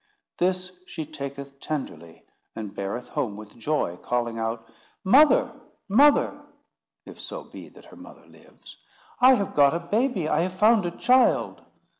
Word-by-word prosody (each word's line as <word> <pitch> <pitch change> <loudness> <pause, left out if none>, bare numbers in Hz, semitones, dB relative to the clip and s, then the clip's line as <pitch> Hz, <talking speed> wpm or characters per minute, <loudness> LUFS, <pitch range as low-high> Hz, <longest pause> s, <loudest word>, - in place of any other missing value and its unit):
This 185 0 0 0.2
she 160 -2 -6
taketh 140 0 -8
tenderly, 85 - -7 0.3
and 105 -3 -7
beareth 100 +5 -5
home 105 -4 -3
with 105 -1 -12
joy, 115 - -2
calling 120 0 -3
out, 115 0 -4 0.4
"Mother, 295 - +5 0.3
mother"—if 280 +8 0
so - - -7
be - - -12
that - - -18
her - - -15
mother - - -15
lives—"I 255 +1 -2
have 200 -5 -3
got 145 +1 +4
a - - -1
baby—I 190 - 0
have 180 +2 -2
found 210 -1 +3
a 170 - -7
child!" 255 0 +2
155 Hz, 135 wpm, -25 LUFS, -, 0.4 s, Mother